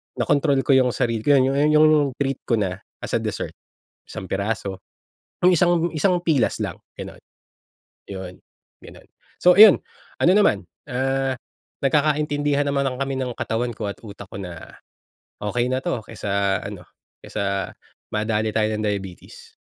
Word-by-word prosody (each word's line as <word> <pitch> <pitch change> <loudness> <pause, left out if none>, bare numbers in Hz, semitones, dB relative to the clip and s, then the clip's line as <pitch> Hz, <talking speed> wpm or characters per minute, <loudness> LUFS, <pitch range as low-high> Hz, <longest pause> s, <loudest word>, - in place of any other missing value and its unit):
na-kontrol 145 0 +2
ko - - +1
yung 130 -1 +4
sarili 115 -3 0
ko, 145 +3 +5
kaya 130 0 +3
ayun 140 +2 +2
yung 155 0 +7
yung 150 -2 +3
treat 135 -1 -1
ko 115 - +3
na 95 -3 -2 0.2
as - - -5
a - - +2
dessert, - - -4 0.5
1 95 - -8
piraso, 100 -1 -2 0.7
yung 180 - +6
isang 175 0 +3
1 175 +3 +1
pilas 160 -6 +1
lang - - -3 0.2
ganon, - - -9 0.9
yun 95 -2 -7 0.5
ganun. - - -14 0.3
So 180 0 +6
iyon, 210 -1 +9 0.4
ano 175 - +5
naman, 105 - +3 0.2
ah, 135 +1 0 0.5
nagkakaintindihan 145 0 +1
naman 140 0 0 0.2
kami 135 0 -2
ng 130 -2 -2
katawan 120 +2 -1
ko 105 - -3
at - - -20
utak 100 -2 -10
ko - - -10
na, 90 -4 -9 0.7
okey 120 +4 0
na 130 +1 -1
to - - -1
kaysa 100 -1 -1
ano, 95 -4 -8 0.4
kaysa 100 -2 -2 0.4
madale 110 0 0
tayo 110 -1 +1
ng 105 - -3
diabetes. 95 -3 -6
125 Hz, 150 wpm, -22 LUFS, 100-145 Hz, 0.9 s, iyon